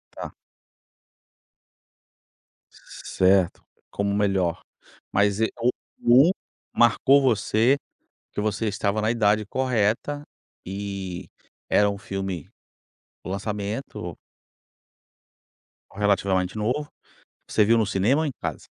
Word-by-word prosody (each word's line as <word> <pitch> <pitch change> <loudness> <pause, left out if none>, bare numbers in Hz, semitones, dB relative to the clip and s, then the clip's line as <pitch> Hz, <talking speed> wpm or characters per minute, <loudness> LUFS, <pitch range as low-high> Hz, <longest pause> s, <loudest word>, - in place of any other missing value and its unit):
Tá. - - -6 2.4
Certo, 95 -1 0 0.3
como 100 0 -1
o 100 - 0
melhor. 95 -4 +1 0.5
Mas 100 +1 +2
e 110 - +3
o 120 - +2 0.6
um - - +4 0.4
marcou 135 +4 +5
você, 120 +1 +3 0.5
porque - - -4
você 110 +1 -1
estava 100 +1 -1
na 110 - +2
idade 105 -2 +2
correta 130 +4 0 0.4
e 95 -2 -5 0.4
era 105 0 +4
um 100 - -4
filme 95 -5 -5 0.7
o - - -7
lançamento. 100 - -4 1.8
Relativamente 100 -1 +1
novo, 125 +8 -1 0.6
você 105 - +3
viu 115 +3 +4
no 110 - +2
cinema 110 +10 +2
ou 160 - 0
em 140 - -3
casa? - - -5
105 Hz, 100 wpm, -24 LUFS, 100-115 Hz, 2.4 s, marcou